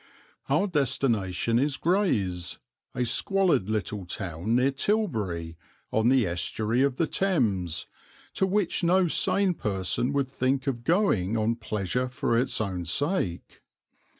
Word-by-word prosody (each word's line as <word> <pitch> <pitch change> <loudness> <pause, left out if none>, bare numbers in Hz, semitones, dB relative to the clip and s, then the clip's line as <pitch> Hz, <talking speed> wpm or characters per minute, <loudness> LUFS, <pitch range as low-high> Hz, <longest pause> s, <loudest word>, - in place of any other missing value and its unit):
Our 200 - +3
destination 115 - 0
is 140 +1 0
Grays, 105 - 0 0.4
a 125 - 0
squalid 150 - +2
little 105 -2 -2
town 90 +4 -2
near 130 +3 +3
Tilbury, 110 - -1 0.3
on 110 +2 +2
the 130 -3 +4
estuary 105 +7 -1
of 140 -2 +2
the 165 - +1
Thames, 110 - 0 0.5
to 190 - +1
which 190 -2 0
no 180 +1 +4
sane 190 +3 +2
person 100 - -1
would 140 -2 -1
think 130 0 0
of 120 -4 -2
going 115 - +2
on 110 +1 +1
pleasure 115 +2 -2
for 120 -2 -1
its 125 +3 +1
own 95 -5 -3
sake. 120 - -1
120 Hz, 130 wpm, -27 LUFS, 95-150 Hz, 0.5 s, the